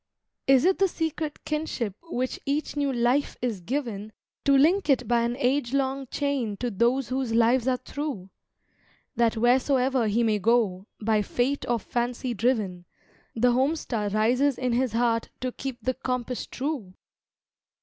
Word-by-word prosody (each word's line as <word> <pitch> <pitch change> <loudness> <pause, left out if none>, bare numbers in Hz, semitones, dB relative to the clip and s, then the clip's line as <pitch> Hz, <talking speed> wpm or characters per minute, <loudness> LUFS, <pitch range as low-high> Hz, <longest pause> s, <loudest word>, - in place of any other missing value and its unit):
Is 270 +2 +5
it 380 +1 +3
the 390 - +5
secret 320 -3 -4
kinship 300 -9 -2
which 255 -7 -3
each 290 +2 -2
new 285 -1 0
life 245 +3 +1
is 230 -6 -2
given 220 -2 -3 0.3
To 275 -1 +5
link 325 +5 +3
it 250 -4 +3
by 235 0 +3
an 235 +1 -1
age 260 -1 +1
long 270 0 -1
chain 265 -7 -2
to 245 +2 -2
those 240 +5 +1
whose 255 -3 -1
lives 235 +2 +3
are 255 -1 +2
through, 260 -11 -5 0.8
That 230 -1 +2
wheresoever 255 +1 +3
he 225 +3 +2
may 215 -2 +2
go, 210 -3 +1
by 215 -1 +2
fate 250 +6 -1
or 240 - +3
fancy 240 +3 -2
driven, 210 -6 0 0.5
The 245 +2 +3
home 265 +6 +2
star 220 -9 -2
rises 245 +6 +2
in 250 -2 -1
his 250 -1 +1
heart 230 -1 +1
to 255 0 -2
keep 265 0 -5
the 255 - +1
compass 250 -1 -3
true? 255 -9 -4
250 Hz, 160 wpm, -26 LUFS, 230-275 Hz, 0.8 s, Is